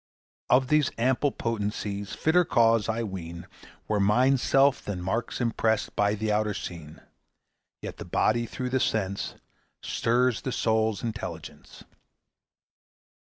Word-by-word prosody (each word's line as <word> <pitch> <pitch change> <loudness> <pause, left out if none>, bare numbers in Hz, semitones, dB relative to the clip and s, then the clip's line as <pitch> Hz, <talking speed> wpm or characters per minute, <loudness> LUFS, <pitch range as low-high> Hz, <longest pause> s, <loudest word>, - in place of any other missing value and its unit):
Of 130 +1 +4
these 150 -3 +3
ample 130 +4 +2
potencies 105 -3 -3
Fitter 175 +3 +3
cause, 115 - +3
I 115 +1 -1
ween, 85 -4 -6 0.4
Were 105 -1 +1
Mind's 125 +6 +3
self 135 0 +3
than 100 -3 -4
marks 95 +7 -2
impressed 115 -2 0
By 105 0 +2
the 110 +1 -1
outer 105 -1 0
scene. 80 -5 -8 0.8
Yet - - -6
the - - -8
body 120 +2 +1
through 125 +2 -4
the 130 - +2
sense 100 -5 -1 0.5
Stirs 120 0 +1
the 130 - -3
soul's 110 -3 0
intelligence. 110 -2 -7
110 Hz, 125 wpm, -27 LUFS, 100-125 Hz, 0.8 s, Of